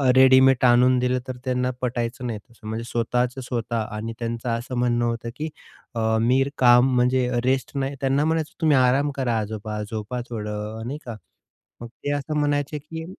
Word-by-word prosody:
Readymade 130 0 +6
आणून 125 +1 +5
दिलं 125 0 +1
तर 130 -1 -5
त्यांना 125 0 0
पटायचं 120 0 -2
नाही 110 -3 -4
तसं. 115 -1 -16
म्हणजे 110 +1 -3
स्वतःचं-स्वतः 120 -1 -1
आणि 110 +2 -4
त्यांचं 115 +1 -3
असं 120 +2 -3
म्हणणं 120 -1 +1
होतं 115 0 -2
की 155 +1 -3 0.5
अ, - - -1 0.2
"मी 125 +3 +3
काम 125 +1 +5
म्हणजे 125 0 +2
रेस्ट 130 0 0
नाही." 135 +1 -2
त्यांना 135 +2 +2
म्हणायचो, 160 0 -1
"तुम्ही 155 -4 +4
आराम 130 +3 +3
करा 120 -4 0
आजोबा 105 0 -4
झोपा 110 +3 -4
थोडं 105 0 -5
नाही 140 +4 -4
का." 115 -3 -6 0.6
मग 120 - -6 0.2
ते 145 - -1
असं 145 +1 -2
म्हणायचे 145 0 0
की 160 +2 -8
125 Hz, 170 wpm, -24 LUFS, 115-135 Hz, 0.6 s, Readymade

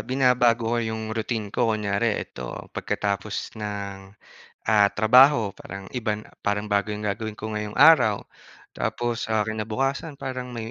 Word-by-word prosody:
binabago 125 -3 +2
ko 120 - +1
yung 110 -1 -3
routine 110 -2 -3
ko 120 - +1
kunyari 105 0 0
ito 65 -1 -6
pagkatapos 100 0 -3
ng, 100 -1 -6 0.5
ah, 105 -2 +6
trabaho 115 +1 +6
parang 95 0 -10
iba 115 -4 -1
na 105 0 -10 0.2
parang 105 +1 -1
bago 100 +1 +1
yung 105 - -6
gagawin 105 +1 -3
ko 110 +1 -6
ngayong 105 -1 -4
araw. 125 -8 +6 0.5
Tapos 120 -1 -2
sa 110 -1 +1
kinabukasan 120 +8 -2
parang 130 -2 -6
may 115 -1 -5
110 Hz, 145 wpm, -25 LUFS, 105-120 Hz, 0.5 s, ah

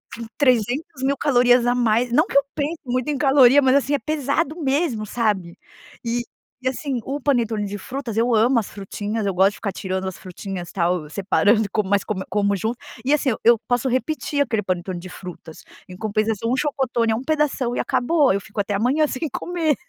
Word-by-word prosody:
com 230 - -7
300.000 255 +2 +1
mil 280 +1 +2
calorias 245 -3 +4
a 245 - +3
mais. 235 0 +1
Não 305 +8 +3
que - - +1
eu 280 - +5
pense 310 +2 -2
muito 255 +1 -1
em 290 - 0
caloria. 275 -1 +6
Mas 265 0 +4
assim 280 +1 +2
é 285 - +2
pesado 310 +2 -1
mesmo, 270 -6 0
sabe. 205 -6 -1 0.5
E 240 +1 0 0.4
e - - -1
assim 265 -1 -3
o 280 +2 -3
panetone 235 -7 0
de 205 +1 -5
frutas 245 0 -5
eu 235 +1 +3
amo 235 +3 +4
as 210 - -5
frutinhas, 205 +2 -4
eu 195 - 0
gosto 190 +2 +4
de - - -13
ficar 200 -3 -4
tirando 190 0 -3
as 190 - -5
frutinhas 185 -1 -7
tal, 170 -4 -1
separando, 205 +3 +2
como 210 -3 -1
mas 200 0 +2
como 190 -3 -3
como 200 -1 +1
junto. 220 +6 -2 0.3
E 280 - +1
assim 285 -2 0
eu - - -4
eu 235 0 +6
posso 245 +1 +1
repetir 285 +3 -1
aquele 225 -5 -1
panetone 180 -1 -3
de 185 +1 -9
frutas. 175 -3 -10 0.3
Em 180 - -10
compensação, 215 +2 -1
o 255 - +2
chocotone 255 -5 0
é - - +1
um 245 - -4
pedação 295 -5 0
e - - -2
acabou. 290 - +2
Eu 200 - 0
fico 205 +2 -8
até 200 0 -2
amanhã 265 +9 +2
sem 300 +3 -3
comer, 330 -4 0
235 Hz, 210 wpm, -22 LUFS, 205-275 Hz, 0.5 s, caloria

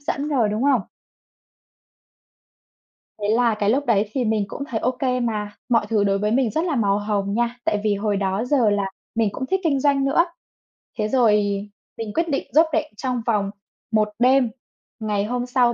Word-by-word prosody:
dẫn 285 +1 -2
rồi, 245 -8 +2
đúng 215 +4 -2
không? 275 -5 +4 2.4
Thế 205 - 0
là 230 0 +3
cái 205 -1 0
lúc 275 +5 +1
đấy 210 -3 +2
thì 260 -3 -1
mình 215 -2 +1
cũng 280 - -6
thấy 230 -6 -3
ô 250 - +1
kê 255 0 -1
mà, 215 -4 -2 0.2
mọi 230 -3 +3
thứ 210 -2 +2
đối 195 0 +1
với 210 +1 0
mình 250 -2 +2
rất 320 +2 0
là 320 - 0
màu 205 -4 +2
hồng 205 -1 -1
nha. 240 +1 0
Tại 205 -1 0
vì 210 -1 +2
hồi 205 0 -1
đó 195 +2 -1
giờ 250 -5 +3
là 205 -1 +1 0.3
mình 225 -3 +2
cũng 260 - -4
thích 380 +7 0
kinh 280 -4 +2
doanh 280 -1 +2
nữa. 320 +5 +3 0.7
Thế 210 -1 0
rồi 240 -3 +4 0.7
mình 220 -2 -5
quyết 335 0 0
định 275 - -1
rốp 320 +2 +6
rẻng - - 0
trong 250 -1 -2
vòng 205 -4 0 0.4
1 215 -1 +2
đêm, 255 0 +4 0.5
ngày 210 -2 -1
hôm 245 +2 -2
sau 245 -1 +2
230 Hz, 200 wpm, -22 LUFS, 210-260 Hz, 2.4 s, rốp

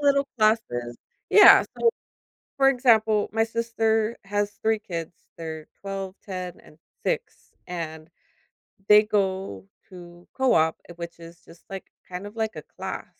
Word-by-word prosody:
little 280 -1 +3
classes. 120 - +1 0.3
Yeah. 415 - +9 0.2
So 465 - +4 0.7
for 270 -1 +5
example, 225 -5 +3
my 225 0 +2
sister 225 -1 0
has 205 +1 -1
3 220 0 +2
kids. 170 -7 -6 0.2
They're 160 -2 -7
12, 195 -1 -5
10, 185 -3 -6
and 150 - -19 0.3
6, 480 -1 -3 0.2
and 160 -2 -6 0.8
they 210 0 +8
go 190 - -1 0.2
to 175 -2 -13
co-op, 160 -12 +3
eh, - - -8
which 170 0 -8
is 165 0 -13
just 170 - -17
like, 195 -1 -8 0.2
kind 180 +2 -6
of 205 +2 -10
like 220 -1 -2
a - - -6 0.2
class. - - -5
200 Hz, 140 wpm, -25 LUFS, 170-225 Hz, 0.8 s, Yeah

